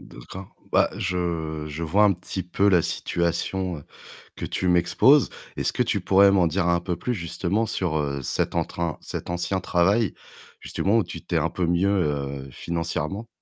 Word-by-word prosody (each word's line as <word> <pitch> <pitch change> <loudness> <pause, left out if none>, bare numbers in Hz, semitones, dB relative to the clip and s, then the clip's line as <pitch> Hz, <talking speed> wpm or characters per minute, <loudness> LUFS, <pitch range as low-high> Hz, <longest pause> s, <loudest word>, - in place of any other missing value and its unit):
D'accord. 90 +10 -11 0.2
Bah, - - +4
je 85 -4 -2
je 75 +2 -6
vois 95 +6 +3
un 105 - +5
petit 90 +1 -5
peu 95 +3 +1
la 90 -3 +5
situation, 85 +2 -1
heu, 70 - -13 0.5
que - - -4
tu 95 - -2
m'exposes. 90 +11 +4 0.3
Est-ce - - 0
que - - -1
tu - - -1
pourrais 100 +1 +5
m'en 95 -3 +4
dire 85 +2 0
un 85 0 +2
peu 90 -1 -3
plus 125 +8 -2
justement 95 +3 -1
sur, 90 -6 -1
heu, 70 -2 -2
cet 65 - -1
entrain 85 -2 -2
cet - - -6
ancien 90 +2 -1
travail 95 +5 +2 0.5
justement 105 +4 0
où 115 - +3
tu - - -8
t'es - - 0
un - - +1
peu 90 - -1
mieux, 90 +3 +2
heu, 70 -7 -1
financièrement? 85 - -3
90 Hz, 180 wpm, -24 LUFS, 80-95 Hz, 0.5 s, un